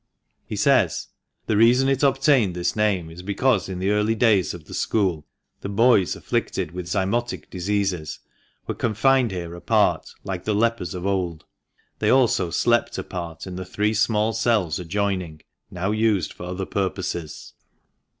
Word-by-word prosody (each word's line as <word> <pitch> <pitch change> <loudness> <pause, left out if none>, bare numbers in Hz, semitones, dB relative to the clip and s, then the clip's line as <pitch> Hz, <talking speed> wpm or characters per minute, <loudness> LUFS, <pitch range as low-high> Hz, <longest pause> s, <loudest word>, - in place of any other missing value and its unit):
He - - -4
says: - - +2 0.2
" - - -51
The 110 - 0
reason 120 +4 +5
it 135 -1 +1
obtained 135 - +3
this 90 0 -1
name 100 -6 0
is 85 +2 -10
because 100 +1 +1
in 95 - -4
the 95 +2 0
early 105 +2 +2
days 105 -5 +3
of 80 -3 -12
the - - -11
school, 95 -8 0 0.3
the 100 - -6
boys 105 -2 +3
afflicted 90 -5 -2
with 90 0 -6
zymotic 110 +6 -2
diseases 95 -3 -2 0.5
were - - -3
confined 120 +3 +2
here 85 -3 -5
apart 85 - +1
like 95 -2 -4
the 105 +1 0
lepers 115 -5 0
of 90 +1 -5
old. 90 -6 -2 0.5
They 105 - +1
also 120 -9 +3
slept 120 +7 +1
apart 85 -3 -6
in 90 -1 -7
the 95 - -4
three 105 +4 -1
small 110 0 +1
cells 110 -8 +1
adjoining, 90 -3 -2 0.3
now 95 +3 -2
used 110 -6 +1
for 90 - -9
other 90 +1 -4
purposes." 90 -5 -4
100 Hz, 160 wpm, -23 LUFS, 90-110 Hz, 0.5 s, reason